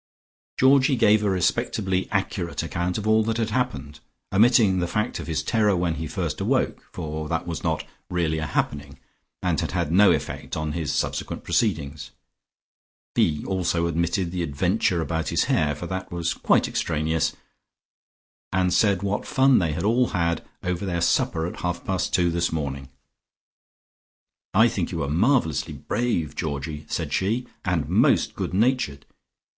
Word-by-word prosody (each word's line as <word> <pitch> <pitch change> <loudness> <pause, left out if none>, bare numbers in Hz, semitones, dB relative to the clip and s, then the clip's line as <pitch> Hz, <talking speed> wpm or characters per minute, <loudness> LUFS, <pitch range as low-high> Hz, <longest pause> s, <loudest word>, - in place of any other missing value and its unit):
Georgie 135 +1 +5
gave 105 -2 +4
a 105 - +2
respectably 95 0 0
accurate 95 -4 -2
account 85 +3 -2
of 105 0 -3
all 110 0 +5
that 115 +1 -1
had 110 -2 -1
happened, 125 - -2 0.3
omitting 105 -2 +5
the 90 - 0
fact 105 +6 -2
of - - -7
his 80 -2 -1
terror 105 -4 +2
when 85 -2 -1
first - - -3
he - - -2
awoke, - - 0
for 75 0 -5
that 80 -1 -1
was 85 -5 -5
not - - -1 0.2
really 80 -3 0
a 80 - -3
happening, 70 -2 -2 0.5
and - - +1
had - - -3
had 85 -4 -1
no 100 +3 +6
effect 70 +1 -3
on 75 -1 -2
his 80 -3 -2
subsequent - - -2
proceedings. 75 - -1 1.0
He 75 -2 +1
also 90 -3 0
omitted 85 +2 0
the 90 -1 -2
adventure 90 +3 0
about 80 0 -2
his - - +2
hair, 75 -2 +1
for 80 - -7
that 95 +1 -5
was 85 -1 -1
quite - - +2
extraneous, 80 +1 -1 1.2
and 90 -1 +1
said 100 -3 +3
what 100 +1 -2
fun 130 -1 +4
they 80 -5 0
had 80 - -3
all 120 +4 +3
had 85 -1 -1 0.2
over 90 +1 -2
their 90 -3 -1
supper 80 -1 +1
at 85 - -5
half 90 0 -3
past 95 -1 -1
two 85 -2 +2
this 85 0 0
morning. 70 -4 -4 1.7
"I - - +7
think - - -2
you - - -3
were 70 - -2
marvellously 85 - +1
brave, 95 -11 -2
Georgie," 75 -1 -4
said 80 -4 -3
she, 110 +10 0 0.2
"and - - 0
most - - +3
good - - -3
natured. 110 - +1
85 Hz, 160 wpm, -24 LUFS, 80-100 Hz, 1.7 s, I